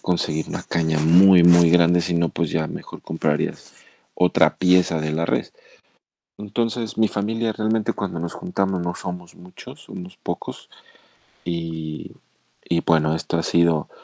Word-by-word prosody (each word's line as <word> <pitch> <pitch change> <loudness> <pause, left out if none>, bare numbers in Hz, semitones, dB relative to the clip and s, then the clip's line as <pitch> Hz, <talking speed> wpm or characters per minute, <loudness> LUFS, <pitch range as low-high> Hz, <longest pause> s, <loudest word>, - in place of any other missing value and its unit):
conseguir 80 -3 -2
una - - -5
caña 80 -2 -1
muy 90 +3 +6
muy 85 -1 +6
grande, 85 0 +4
sino, 85 -1 0
pues, 85 -2 -3
ya 80 -1 -1
mejor - - -9
comprarías 75 -2 -3 0.4
otra 90 0 +2
pieza 90 -3 +3
de 75 0 -2
la 85 +2 -1
res. - - -2 0.9
Entonces, 110 +2 -3
mi 110 - +4
familia, 110 +2 -2
realmente 110 0 -1
cuando 95 -4 -5
nos 85 - -5
juntamos, 95 - -2
no 85 0 -3
somos 90 -1 -8
muchos, 90 +1 -14
unos 90 +1 -10
pocos - - -7 0.8
y 80 -2 -5 0.5
y, 85 -1 0
bueno, 80 -1 +2
esto 85 +1 -3
ha 85 - -1
sido 85 -3 +1
85 Hz, 145 wpm, -22 LUFS, 80-95 Hz, 0.9 s, muy